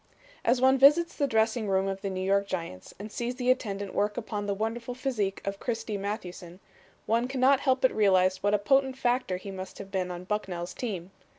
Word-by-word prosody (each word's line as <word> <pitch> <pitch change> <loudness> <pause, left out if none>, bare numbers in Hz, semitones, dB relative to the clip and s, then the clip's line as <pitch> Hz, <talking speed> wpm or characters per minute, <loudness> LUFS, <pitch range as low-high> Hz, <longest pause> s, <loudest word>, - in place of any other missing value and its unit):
As 245 +2 +3
one 265 +1 +4
visits 300 +5 +6
the 285 - +1
dressing 220 -1 +1
room 190 0 +2
of 195 0 -3
the 200 - -2
New 185 0 -3
York 200 +1 +2
Giants 165 - -5
and 205 +2 -8
sees 240 +2 -3
the 250 0 +2
attendant 200 -6 -2
work 205 +1 0
upon 210 -3 -4
the 200 - +1
wonderful 230 +3 -3
physique 240 -7 -2
of 195 0 -3
Christy 225 -3 -3
Mathewson, 185 -3 -6 0.5
one 230 +2 +1
cannot 265 +1 +3
help 265 -2 +1
but 260 - +4
realize 185 -3 +3
what 205 +1 +2
a - - +4
potent 265 +5 +2
factor 245 -7 0
he 195 +2 -8
must 190 0 -8
have 195 -1 -9
been 185 -2 -1
on 175 0 -6
Bucknell's 180 -3 -3
team. 195 -7 -5
210 Hz, 205 wpm, -28 LUFS, 195-245 Hz, 0.5 s, visits